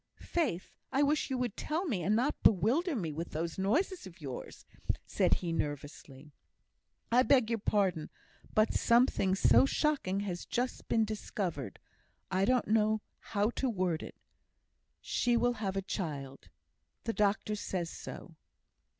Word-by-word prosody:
"Faith, 265 Hz, -, -2 dB, 0.2 s
I 275 Hz, +2 st, +3 dB
wish 295 Hz, +1 st, +1 dB
you 260 Hz, -, -1 dB
would 245 Hz, -4 st, -2 dB
tell 325 Hz, +5 st, -2 dB
me, 220 Hz, -, -1 dB
and 205 Hz, +6 st, +2 dB
not 255 Hz, +6 st, 0 dB
bewilder 260 Hz, -, +3 dB
me 170 Hz, -9 st, -2 dB
with 165 Hz, +3 st, -4 dB
those 165 Hz, +4 st, -3 dB
noises 305 Hz, -, 0 dB
of 185 Hz, 0 st, -14 dB
yours," 135 Hz, -5 st, -7 dB, 0.4 s
said -, -, +2 dB
he, 170 Hz, -2 st, -3 dB
nervously. 145 Hz, -1 st, -5 dB, 0.8 s
"I 245 Hz, +2 st, +6 dB
beg 255 Hz, -4 st, +4 dB
your 230 Hz, -, 0 dB
pardon; 190 Hz, -7 st, +1 dB, 0.5 s
but 215 Hz, +1 st, +4 dB
something 235 Hz, -5 st, +3 dB
so 120 Hz, -5 st, +5 dB
shocking 200 Hz, -, 0 dB
has 180 Hz, -4 st, -4 dB
just 250 Hz, +1 st, -2 dB
been 225 Hz, -1 st, +3 dB
discovered 185 Hz, -, -4 dB, 0.5 s
I 190 Hz, +1 st, +2 dB
don't 250 Hz, 0 st, +2 dB
know 215 Hz, 0 st, +2 dB, 0.2 s
how 210 Hz, +1 st, 0 dB
to 260 Hz, +1 st, -1 dB
word 180 Hz, -6 st, 0 dB
it -, -, -8 dB, 0.9 s
She 240 Hz, -1 st, +1 dB
will 245 Hz, +1 st, +2 dB
have 200 Hz, -4 st, -3 dB
a 195 Hz, -, -1 dB
child. 140 Hz, -, -5 dB, 0.5 s
The 230 Hz, -, -1 dB
doctor 210 Hz, 0 st, +1 dB
says 180 Hz, -4 st, -3 dB
so." -, -, -9 dB
205 Hz, 150 wpm, -32 LUFS, 170-240 Hz, 0.9 s, I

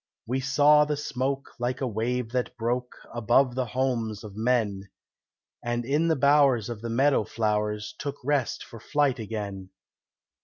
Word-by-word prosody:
We 130 Hz, +4 st, -1 dB
saw 145 Hz, +3 st, +5 dB
the 150 Hz, 0 st, -1 dB
smoke 135 Hz, -2 st, -3 dB
like 125 Hz, +1 st, -1 dB
a 135 Hz, -, -1 dB
wave 120 Hz, +1 st, -2 dB
that 125 Hz, 0 st, -2 dB
broke 125 Hz, +2 st, -2 dB, 0.2 s
Above 120 Hz, +3 st, +3 dB
the 130 Hz, 0 st, -1 dB
homes 115 Hz, -3 st, -1 dB
of 105 Hz, -2 st, -9 dB
men, 110 Hz, -4 st, 0 dB, 0.7 s
And 120 Hz, 0 st, -2 dB
in 150 Hz, +6 st, +1 dB
the 160 Hz, -, +3 dB
bowers 140 Hz, -5 st, +4 dB
of 115 Hz, -3 st, -6 dB
the 115 Hz, -, -4 dB
meadow 135 Hz, +1 st, +3 dB
flowers 105 Hz, +1 st, -1 dB
Took 140 Hz, 0 st, -3 dB
rest 140 Hz, -2 st, 0 dB
for 115 Hz, -, -11 dB
flight 140 Hz, +1 st, +1 dB
again. 100 Hz, -3 st, -5 dB
125 Hz, 155 wpm, -27 LUFS, 110-135 Hz, 0.7 s, saw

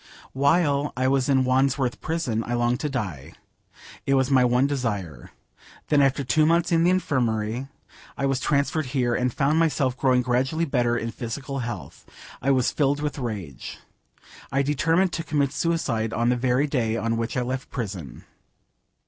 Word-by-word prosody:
While 145 Hz, +1 st, +2 dB
I 130 Hz, +1 st, +1 dB
was 135 Hz, 0 st, +1 dB
in 135 Hz, -1 st, +4 dB
Wandsworth 130 Hz, 0 st, +1 dB
prison 140 Hz, -9 st, -1 dB
I 120 Hz, -, -1 dB
longed 120 Hz, +1 st, +1 dB
to 150 Hz, -, -2 dB
die. 95 Hz, -, -5 dB, 0.7 s
It 135 Hz, -, +3 dB
was 130 Hz, 0 st, +1 dB
my 130 Hz, -2 st, +5 dB
one 125 Hz, +2 st, +3 dB
desire. 105 Hz, -, -3 dB, 0.6 s
When 150 Hz, -2 st, +4 dB
after 135 Hz, 0 st, +2 dB
two 135 Hz, +5 st, +2 dB
months 170 Hz, +2 st, +2 dB
in 165 Hz, -1 st, +3 dB
the 175 Hz, -, +4 dB
infirmary 125 Hz, -8 st, 0 dB, 0.5 s
I 140 Hz, -, -1 dB
was 135 Hz, -1 st, +1 dB
transferred 140 Hz, +1 st, 0 dB
here, 120 Hz, -2 st, +1 dB
and 125 Hz, +1 st, 0 dB
found 145 Hz, +6 st, +1 dB
myself 145 Hz, -6 st, +1 dB
growing 130 Hz, -2 st, +2 dB
gradually 130 Hz, +7 st, 0 dB
better 120 Hz, -5 st, +1 dB
in 115 Hz, 0 st, -3 dB
physical 135 Hz, +4 st, -5 dB
health, 115 Hz, -, -7 dB, 0.3 s
I 135 Hz, -, 0 dB
was 130 Hz, -3 st, +3 dB
filled 145 Hz, -1 st, +1 dB
with 150 Hz, -1 st, -3 dB
rage. 105 Hz, -, -6 dB, 0.7 s
I 135 Hz, +1 st, +2 dB
determined 165 Hz, +6 st, +1 dB
to 165 Hz, -, -2 dB
commit 145 Hz, -3 st, 0 dB
suicide 120 Hz, -11 st, -1 dB
on 120 Hz, +1 st, +1 dB
the 125 Hz, -, +3 dB
very 125 Hz, +3 st, +1 dB
day 115 Hz, -6 st, 0 dB
on 115 Hz, +1 st, -1 dB
which 115 Hz, +2 st, -3 dB
I 125 Hz, -, +1 dB
left 130 Hz, +2 st, -4 dB
prison. 95 Hz, -, -6 dB
130 Hz, 170 wpm, -24 LUFS, 120-145 Hz, 0.7 s, my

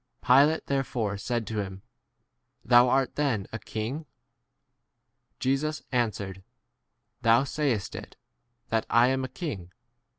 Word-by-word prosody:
Pilate 145 Hz, +5 st, +5 dB
therefore 125 Hz, -7 st, -1 dB
said 120 Hz, +3 st, -2 dB
to 110 Hz, +1 st, -3 dB
him, 95 Hz, -1 st, -7 dB, 0.8 s
Thou' 120 Hz, +1 st, +6 dB
art 135 Hz, 0 st, +2 dB
then 130 Hz, -10 st, 0 dB
a 115 Hz, -, -3 dB
king? 125 Hz, +11 st, -5 dB, 1.3 s
Jesus 145 Hz, +4 st, -1 dB
answered, 105 Hz, -6 st, -1 dB, 0.8 s
Thou* 115 Hz, +3 st, +5 dB
sayest 135 Hz, -8 st, -1 dB
[it], -, -, -9 dB, 0.5 s
that 115 Hz, -1 st, 0 dB
I" 120 Hz, +2 st, +5 dB
am 130 Hz, 0 st, 0 dB
a -, -, -2 dB
king. 110 Hz, -, -6 dB
120 Hz, 120 wpm, -27 LUFS, 110-135 Hz, 1.3 s, Thou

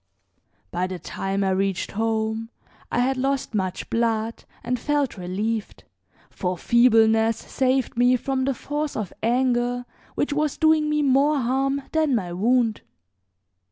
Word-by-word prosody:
By 180 Hz, +1 st, -1 dB
the 185 Hz, -1 st, -5 dB
time 195 Hz, +2 st, -3 dB
I 190 Hz, -, +1 dB
reached 195 Hz, 0 st, -1 dB
home 220 Hz, +1 st, -1 dB, 0.4 s
I 245 Hz, -, +1 dB
had 260 Hz, +1 st, +1 dB
lost 270 Hz, -1 st, -1 dB
much 185 Hz, -3 st, -2 dB
blood 230 Hz, -1 st, -1 dB, 0.2 s
and 250 Hz, 0 st, -1 dB
felt 290 Hz, 0 st, 0 dB
relieved, 205 Hz, +4 st, -3 dB, 0.5 s
for 180 Hz, -1 st, -3 dB
feebleness 225 Hz, 0 st, +4 dB
saved 260 Hz, 0 st, 0 dB
me 245 Hz, +1 st, +4 dB
from 260 Hz, +1 st, -1 dB
the 275 Hz, -1 st, 0 dB
force 295 Hz, +3 st, -3 dB
of 210 Hz, -5 st, -4 dB
anger 245 Hz, 0 st, +1 dB, 0.3 s
which 290 Hz, -, 0 dB
was 300 Hz, -1 st, 0 dB
doing 315 Hz, -1 st, +3 dB
me 300 Hz, 0 st, +1 dB
more 280 Hz, +2 st, +3 dB
harm 270 Hz, +2 st, 0 dB
than 310 Hz, -4 st, +2 dB
my 180 Hz, -6 st, -2 dB
wound. 230 Hz, +3 st, +1 dB
240 Hz, 140 wpm, -24 LUFS, 220-270 Hz, 0.5 s, feebleness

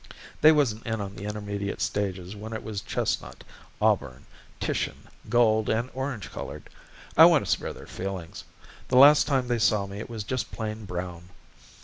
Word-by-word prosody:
They 155 Hz, -, +9 dB
wasn't 125 Hz, -9 st, +1 dB
in 110 Hz, -1 st, -1 dB
on 100 Hz, -1 st, -5 dB
the 100 Hz, -, -7 dB
intermediate 100 Hz, -1 st, -4 dB
stages 95 Hz, -1 st, -2 dB
when 110 Hz, +2 st, -7 dB
it 110 Hz, -, -5 dB
was 105 Hz, -2 st, -4 dB
chestnut, -, -, -3 dB, 0.4 s
auburn, 65 Hz, +2 st, +1 dB, 0.3 s
Titian, -, -, -3 dB, 0.2 s
gold, 110 Hz, -3 st, +3 dB
and 115 Hz, +3 st, 0 dB
orange 130 Hz, -6 st, -4 dB
colored. -, -, -8 dB, 0.4 s
I -, -, +10 dB
want -, -, +5 dB
to -, -, -1 dB
spare -, -, 0 dB
their -, -, -11 dB
feelings. 95 Hz, -3 st, -6 dB, 0.4 s
The 125 Hz, -, +2 dB
last 145 Hz, +3 st, +8 dB
time 135 Hz, -4 st, +1 dB
they 120 Hz, -1 st, 0 dB
saw 105 Hz, -2 st, +3 dB
me 100 Hz, +1 st, -8 dB
it 110 Hz, -, -7 dB
was 115 Hz, -3 st, -5 dB
just 130 Hz, +4 st, -3 dB
plain 110 Hz, -1 st, -5 dB
brown. 90 Hz, -1 st, -6 dB
105 Hz, 170 wpm, -27 LUFS, 100-120 Hz, 0.4 s, I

